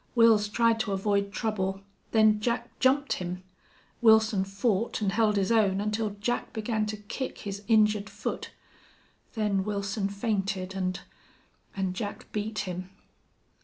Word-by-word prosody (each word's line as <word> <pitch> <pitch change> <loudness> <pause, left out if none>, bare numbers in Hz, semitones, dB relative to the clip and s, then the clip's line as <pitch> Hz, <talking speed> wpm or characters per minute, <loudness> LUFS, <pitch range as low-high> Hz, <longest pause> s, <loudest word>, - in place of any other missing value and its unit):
Wils 220 -3 +5
tried 230 0 +3
to 205 -2 -1
avoid 200 0 0
trouble. 195 -3 -2 0.3
Then 215 -1 +4
Jack 235 +2 -2
jumped 275 +2 +3
him. 180 0 -5 0.6
Wilson 220 -3 +5
fought 200 +3 -1
and 205 -3 0
held 215 0 +2
his 195 +1 +1
own 205 -4 +3
until 210 0 -2
Jack 240 +4 -2
began 220 -1 -1
to 215 0 -4
kick 210 +6 -5
his 200 -1 -5
injured 210 -2 +3
foot. 205 0 -4 0.9
Then 205 -3 +1
Wilson 200 0 -2
fainted 195 -2 -2
and 185 -1 -2 0.7
and 190 -2 -1
Jack 205 +2 -6
beat 215 +1 -3
him." 180 0 -5
210 Hz, 135 wpm, -28 LUFS, 195-220 Hz, 0.9 s, Wils